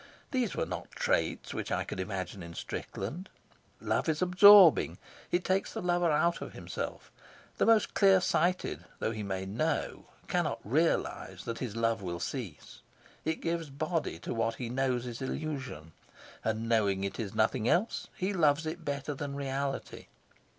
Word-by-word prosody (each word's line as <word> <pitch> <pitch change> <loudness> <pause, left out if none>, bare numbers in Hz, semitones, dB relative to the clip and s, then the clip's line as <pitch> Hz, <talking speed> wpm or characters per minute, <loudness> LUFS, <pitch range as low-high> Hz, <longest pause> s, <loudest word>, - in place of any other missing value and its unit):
These 250 -7 0
were - - 0
not - - -6
traits - - -1
which - - -4
I - - +1
could - - -6
imagine 95 0 -4
in 85 -1 -9
Strickland. 145 - -5 0.5
Love - - 0
is 155 +3 +1
absorbing; 185 -1 +8 0.3
it 175 0 +1
takes 190 +1 0
the - - -3
lover 175 -1 +2
out 165 +3 +2
of - - -7
himself; - - -6 0.5
the - - +3
most 225 -2 +4
clear 195 -2 +6
sighted, 180 0 0
though - - -1
he 110 -1 -4
may 95 -2 -3
know, 120 +12 -2 0.2
cannot - - 0
realise 155 +10 0
that 115 -1 -4
his 120 -5 -4
love 115 -1 +1
will 85 -2 -4
cease; 110 - -6 0.4
it 160 +1 -1
gives 165 -2 -2
body 155 - -2
to 85 - -5
what 115 0 0
he 120 -1 -5
knows 125 -1 0
is 120 0 -6
illusion, 130 - -4 0.5
and, 110 +1 -1
knowing 100 -4 +2
it 100 - -3
is 105 -4 -4
nothing 110 +1 +2
else, 200 +7 +1
he 195 +1 -1
loves 160 -3 +3
it 165 +2 -4
better 145 0 -3
than 140 0 -5
reality. 140 0 -3
140 Hz, 165 wpm, -31 LUFS, 110-170 Hz, 0.5 s, absorbing